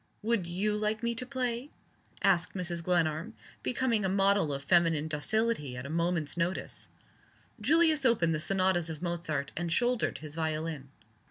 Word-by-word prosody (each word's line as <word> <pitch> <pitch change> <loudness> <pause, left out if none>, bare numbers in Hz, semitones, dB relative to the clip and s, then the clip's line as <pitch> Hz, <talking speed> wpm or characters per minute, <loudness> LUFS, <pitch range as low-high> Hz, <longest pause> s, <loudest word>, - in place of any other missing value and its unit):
"Would 220 -5 +1
you 200 +5 0
like 215 +1 -1
me 235 0 +1
to 250 +2 -1
play?" 255 0 -2 0.5
asked 180 -2 +2
Mrs. 175 -2 -3
Glenarm, 170 +3 +1 0.3
becoming 240 -4 0
a 190 - +1
model 195 -4 +3
of 140 0 -4
feminine 165 -1 +3
docility 155 - 0
at 125 - -6
a 140 - -6
moment's 170 -2 0
notice. 175 +2 -2 0.7
Julius 310 +5 +4
opened 215 -10 +3
the 155 - 0
Sonatas 185 -1 +1
of 160 +1 -6
Mozart, 160 -5 -2
and 170 0 -2
shouldered 240 - +1
his 150 +1 -7
violin. 155 -3 -3
175 Hz, 155 wpm, -30 LUFS, 160-220 Hz, 0.7 s, Julius